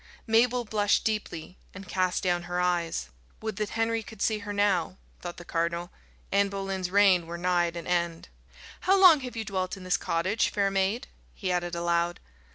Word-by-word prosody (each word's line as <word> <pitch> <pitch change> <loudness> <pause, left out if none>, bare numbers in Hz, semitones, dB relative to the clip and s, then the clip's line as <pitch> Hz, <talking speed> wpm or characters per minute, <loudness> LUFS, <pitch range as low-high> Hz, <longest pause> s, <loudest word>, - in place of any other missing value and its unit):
Mabel 240 +2 +3
blushed 210 -1 +2
deeply, 190 -5 -3 0.2
and 195 0 -9
cast 185 0 0
down 175 -1 +1
her 175 0 -1
eyes. 175 - 0 0.3
"Would 220 -2 -4
that 210 -1 -2
Henry 225 0 +1
could 220 -1 -12
see 215 +1 +1
her 205 0 -6
now!" 200 -2 +1 0.2
thought 175 -1 -6
the 175 - -10
cardinal, 170 +1 -2 0.4
"Anne 200 0 +3
Boleyn's 195 -2 -3
reign 190 -3 +4
were 170 +1 -5
nigh 175 0 +2
at 170 0 -6
an 170 - -6
end. 170 -2 -1 0.5
How 385 +1 +3
long 355 -5 +8
have 250 -2 -7
you 225 -1 -3
dwelt 190 -1 -2
in 190 - -10
this 185 -1 +1
cottage, 185 +6 0
fair 200 -1 0
maid?" 195 +6 0 0.3
he 190 -3 -2
added 175 -1 -1
aloud. 170 0 0
190 Hz, 185 wpm, -28 LUFS, 175-210 Hz, 0.5 s, long